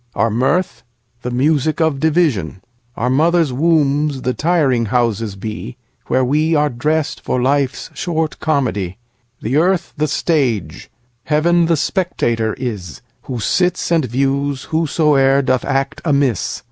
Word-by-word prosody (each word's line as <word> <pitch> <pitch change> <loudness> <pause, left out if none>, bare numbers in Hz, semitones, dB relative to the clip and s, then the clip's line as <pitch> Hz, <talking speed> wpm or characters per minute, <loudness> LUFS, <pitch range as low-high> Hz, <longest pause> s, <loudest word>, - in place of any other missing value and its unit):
Our 115 - +1
mirth? 135 - 0 0.4
The 125 - -4
music 145 +5 +1
of 160 -4 +1
division:Our 120 - -1
mothers' 160 +1 +2
wombs 145 -2 +1
the 125 - 0
tiring 145 -8 +1
houses 115 -2 0
be, 105 - -6 0.3
Where 130 - +2
we 155 +5 +1
are 150 0 +2
dressed 150 +5 -1
for 125 - -1
life's 135 +1 0
short 160 -3 -2
comedy. 105 - -1 0.5
The 125 +6 0
earth 175 +1 +1
the 155 +1 +1
stage; 120 - -1 0.4
Heaven 170 +3 +2
the 165 -1 +2
spectator 120 - -1
is, 105 -10 -6 0.3
Who 125 -2 -3
sits 180 - 0
and 165 -4 +3
views 135 +2 -1
whosoe'er 145 -4 +3
doth 130 -1 +1
act 135 -1 -1
amiss. 140 - 0
140 Hz, 130 wpm, -18 LUFS, 120-160 Hz, 0.5 s, and